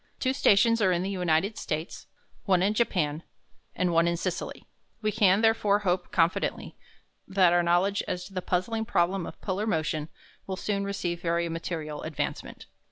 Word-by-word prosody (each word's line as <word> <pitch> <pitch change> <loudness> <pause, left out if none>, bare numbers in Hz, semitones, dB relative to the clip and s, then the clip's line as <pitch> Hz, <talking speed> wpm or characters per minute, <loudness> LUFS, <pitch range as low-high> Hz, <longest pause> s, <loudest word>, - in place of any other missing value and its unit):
Two 260 0 +1
stations 230 -3 +4
are 190 -2 +4
in 175 0 0
the 195 - -2
United 180 +2 0
States, 155 +3 -4 0.4
one 185 -2 +3
in 205 +2 +2
Japan, 170 -9 0 0.5
and 180 -1 0
one 165 +1 +4
in 170 0 0
Sicily. 180 0 -4 0.4
We 215 - +1
can, 205 -2 +4
therefore, 225 -2 +3
hope 180 0 0
confidently 170 0 0 0.5
that 185 -3 +4
our 175 - +4
knowledge 175 +4 +2
as 180 0 -3
to 195 - -13
the 185 - -2
puzzling 205 +6 -1
problem 180 -2 0
of - - -10
polar 200 +2 -2
motion 155 -4 -1 0.4
will 190 -1 -3
soon 200 0 -2
receive 180 -4 -3
very 170 0 0
material 160 -2 -4
advancement. 150 -2 -5
185 Hz, 165 wpm, -27 LUFS, 170-200 Hz, 0.5 s, stations